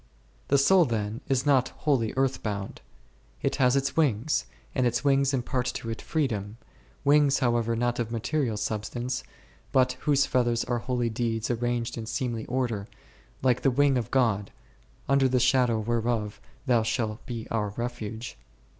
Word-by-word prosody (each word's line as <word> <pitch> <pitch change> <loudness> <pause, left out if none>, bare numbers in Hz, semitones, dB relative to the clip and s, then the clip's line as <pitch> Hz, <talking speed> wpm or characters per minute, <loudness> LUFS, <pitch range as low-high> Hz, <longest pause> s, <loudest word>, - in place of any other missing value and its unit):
The 140 - +4
soul, 175 +6 +5
then, 110 -2 -2
is 130 0 +1
not 135 -3 +3 0.2
wholly 130 -7 +2
earth 135 0 +1
bound; 100 -2 -4 0.6
it - - 0
has 125 -2 +4
its 140 0 0
wings, 145 -3 +1 0.3
and 130 -2 +2
its 120 +2 -1
wings 140 -1 +3
impart 125 -1 -1
to 115 - -4
it 115 - -5
freedom; 115 -9 -2 0.5
wings, 145 -1 +5
however, 120 -2 +1
not 120 +1 0
of 115 -2 -1
material 120 0 -1
substance, 120 +5 -3 0.5
but 130 -1 +3
whose 140 -2 +3
feathers 120 -2 +1
are 120 -1 -1
holy 120 -1 -1
deeds 115 0 -1
arranged 120 0 -1
in 110 - -6
seemly 120 -3 -3
order, 120 -5 -1 0.6
like 125 -2 +3
that 135 - +4
wing 145 -1 +4
of 120 -4 -1
God, 110 -6 +1 0.6
under 140 -1 +3
the 125 0 +2
shadow 125 -2 +3
whereof 115 -1 -1 0.4
shall 110 -1 -1
be 115 -2 -5
our 105 -2 0
refuge. 115 - -5
120 Hz, 155 wpm, -27 LUFS, 115-135 Hz, 0.6 s, soul